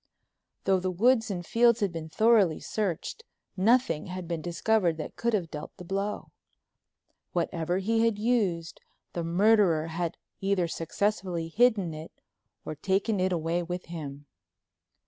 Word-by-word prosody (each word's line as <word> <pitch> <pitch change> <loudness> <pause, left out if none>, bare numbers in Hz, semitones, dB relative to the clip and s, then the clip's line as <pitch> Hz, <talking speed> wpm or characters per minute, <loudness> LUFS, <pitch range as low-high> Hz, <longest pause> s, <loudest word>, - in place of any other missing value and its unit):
Though 190 -1 +3
the 185 +1 -1
woods 225 +5 +3
and 175 -3 -4
fields 235 +4 +4
had 200 -4 0
been 165 -1 -6
thoroughly 215 -4 +4
searched 210 - -3 0.3
nothing 220 - +2
had 185 -1 -6
been 170 -2 -3
discovered 175 0 +1
that 155 - -6
could 235 0 -1
have 180 -6 -1
dealt 150 0 -8
the - - -9
blow. 195 +3 -3 1.0
Whatever 170 0 -1
he 225 +4 +1
had 230 -3 +2
used 205 -8 0 0.3
the 170 - -2
murderer 175 -2 +3
had 170 +1 -3 0.2
either 195 -3 +1
successfully 170 0 -2
hidden 205 -4 +3
it 155 +1 -10 0.5
or - - -4
taken 195 +6 0
it 185 +1 +1
away 170 0 0
with 175 +1 -5
him. 145 -3 -7
185 Hz, 145 wpm, -28 LUFS, 165-215 Hz, 1.0 s, fields